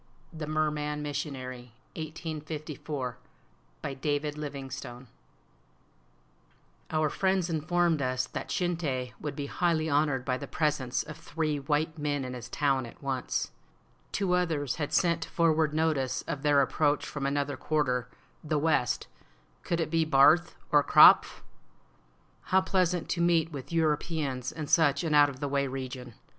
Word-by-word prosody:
THE 155 -2 -5
MERMAN 150 -1 -1
MISSIONARY 130 -4 -5 0.2
I1854I 155 -4 -5 0.7
BY - - -3
DAVID 145 +2 -2
LIVINGSTONE 135 -4 -7 1.8
Our 155 -1 +1
friends 190 +2 0
informed 165 0 +1
us 130 -1 0
that - - -6
Shinte 155 -9 -1
would 150 - -4
be 145 - -4
highly 160 0 0
honored 145 -3 +1
by 130 -1 -1
the 140 - -6
presence 145 -5 0
of 155 -1 -9
three 160 -2 -2
white 155 +3 -1
men 145 -2 -1
in 125 - -5
his 125 -1 -8
town 135 -3 +1
at 115 - -15
once. 135 -2 -2 0.6
Two 190 -3 0
others 160 -7 0
had 150 -2 -3
sent 170 -2 +2
forward 160 -2 +2
notice 150 -5 0
of 150 -5 -4
their 145 -1 +4
approach 145 +2 +1
from 140 -2 -3
another 140 0 -1
quarter 130 -4 0 0.3
(the 155 -1 0
west); 145 -6 +1 0.6
could 170 - -2
it 160 -2 -1
be 165 -1 +3
Barth 155 +3 +5 0.2
or 145 -1 +5
Krapf? - - +7 1.0
How 190 0 +3
pleasant 180 -2 +1
to 170 - 0
meet 170 -1 +3
with 140 -1 -8
Europeans 150 -5 0
in 155 -2 -5
such 145 -1 +3
an 160 -2 0
out 145 -1 +6
of 130 -2 -9
the 145 - -1
way 140 0 0
region! 130 -2 -6
150 Hz, 145 wpm, -29 LUFS, 135-160 Hz, 1.8 s, Krapf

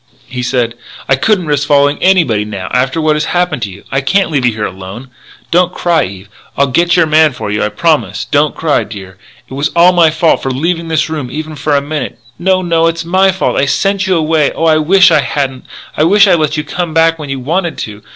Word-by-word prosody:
He 125 0 -5
said: 125 -2 -1 0.3
"I 135 - +3
couldn't 190 +5 0
risk 145 -1 -1
following 145 0 +2
anybody 165 - +2
now, 100 -3 -6
after 130 +5 0
what 155 -1 +1
has 150 0 -1
happened 175 -7 -1
to 105 - -3
you. 95 +1 -13
I 135 - 0
can't 190 +5 +1
leave 135 -5 +1
you 110 -3 -2
alone 95 +4 -9
here! 130 -1 -17 0.4
Don't 180 +1 +2
cry, 170 -2 +1
Eve. 95 +1 -10 0.3
I'll 140 - +3
get 170 +6 +1
your 175 -2 +4
man 155 -1 +3
for 105 -5 -5
you, 105 - -1
I 105 - 0
promise! 155 +8 -1
Don't 150 +1 +1
cry, 160 -2 0
dear. 95 -3 -11 0.3
It - - -12
was 140 +3 -1
all 175 +1 +6
my 170 -2 +4
fault 160 +1 +1
for 135 - -3
leaving 165 +6 -2
this 155 -2 0
room 150 -6 -5
even 155 +3 -6
for 145 0 -1
a 140 - +2
minute 150 -2 -4
" - - -39
"No, 185 +1 +1
no, 170 -2 0
no! 165 - +4
It's 165 0 -2
my 190 +3 +3
fault. 190 - -2
I 140 - +1
sent 195 +5 0
you 185 - +2
away. 155 -2 +1
Oh, 165 - -2
I 160 -1 +4
wish 185 +4 +4
I 155 - +4
hadn't. 135 -2 -3 0.3
I - - +1
wish 200 +5 +5
I - - +3
had 170 - +3
let 155 0 -1
you 150 - -2
come 165 +1 -4
back 165 0 +3
when 150 -2 -7
you 135 -1 -3
wanted 165 +5 -2
to.... 105 -1 -11
155 Hz, 250 wpm, -12 LUFS, 130-170 Hz, 0.4 s, all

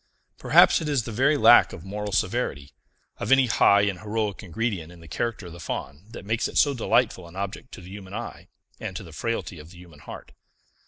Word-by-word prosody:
Perhaps - - +5
it 155 - -3
is 140 -5 +1
the 115 - -6
very 135 +7 +2
lack 120 - +6
of 80 - -10
moral 105 +1 -5
severity, 70 -5 -2 0.5
of - - -3
any 135 -1 +6
high 100 -3 +4
and 100 -3 -1
heroic 105 0 -3
ingredient 100 -3 -3
in 90 - -15
the 85 - -14
character 110 +5 -3
of 85 - -9
the 85 - -11
Faun, 75 +1 -6
that 105 - -10
makes 115 +2 0
it - - -5
so 145 - +4
delightful 115 -6 0
an 85 - -15
object 100 +6 -6
to - - -9
the 90 +1 -12
human 95 -2 -9
eye - - -7 0.3
and - - -6
to - - -6
the 80 - -13
frailty 115 -4 -4
of 75 +2 -12
the 90 - -15
human 85 -4 -15
heart. - - -11
100 Hz, 220 wpm, -25 LUFS, 85-115 Hz, 0.5 s, lack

